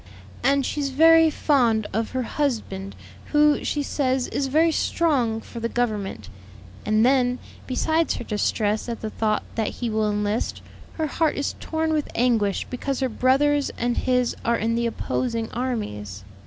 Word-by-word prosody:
"And 275 0 +2
she's 285 -2 -2
very 325 +3 +6
found 240 -8 +2
of 225 +2 -1
her 260 -1 -2
husband, 225 -8 -3 0.3
who, 295 0 +3
she 290 - -1
says, 260 -2 0
is 275 - -1
very 320 +5 +3
strong 260 -10 +1
for 235 - -9
the 230 0 -2
Government; 210 - -2 0.6
and 215 +2 +3
then, 250 -1 +3 0.3
besides 315 +5 +1
her - - -5
distress 210 +1 -1
at 230 - -5
the 220 - -4
thought 215 -1 0
that 220 -1 -1
he 240 -2 -3
will 215 -1 +1
enlist, 210 +1 -2 0.3
her 320 - -2
heart 310 +1 0
is 280 - -2
torn 320 0 -1
with 300 -2 -1
anguish 225 -5 +1
because 260 +2 -3
her 260 -1 0
brothers 275 +4 +2
and 240 0 0
his 250 -1 +1
are 235 0 +2
in 225 +1 0
the 235 0 +1
opposing 230 -1 -2
armies. 105 - -4
245 Hz, 160 wpm, -24 LUFS, 220-280 Hz, 0.6 s, very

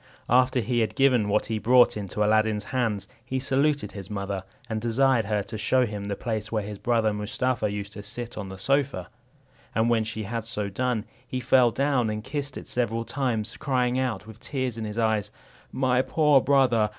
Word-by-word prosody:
After 130 0 +4
he 120 +2 0
had 110 - 0
given 130 -6 +3
what 105 +1 +2
he 110 -1 -2
brought 125 +2 +5
into 105 0 -2
Aladdin's 110 -1 +2
hands, 115 -5 -1 0.2
he 130 +2 -3
saluted 135 -2 +1
his 100 -2 -8
mother, 100 -2 -3 0.2
and 110 -1 -3
desired 120 0 +2
her 105 -1 0
to 110 +2 -7
show 130 +4 +3
him 105 -3 -5
the 100 0 -2
place 110 -1 -3
where 110 -2 0
his 105 -1 -7
brother 115 -3 +2
Mustapha 105 +2 -1
used 100 0 -5
to 105 - -7
sit 120 +3 -7
on 100 -3 -5
the 95 - -8
sofa; 135 -5 0 0.7
and 115 +1 +2
when 115 -2 +3
she 110 0 -4
had 115 +2 -3
so 105 -3 -3
done, 120 +1 -1 0.2
he 130 - -3
fell 125 0 +4
down 135 -2 +1
and 105 0 -3
kissed 140 +1 -4
it - - -9
several 115 -1 -1
times, 115 -6 -2
crying 130 -3 +1
out, 120 -6 -2
with 110 0 -12
tears 130 -4 -3
in 115 -1 -4
his 105 +1 -6
eyes, 110 -2 +1 0.4
"My 130 -1 +2
poor 150 -1 +4
brother! 125 -6 +3
115 Hz, 200 wpm, -26 LUFS, 105-130 Hz, 0.7 s, brought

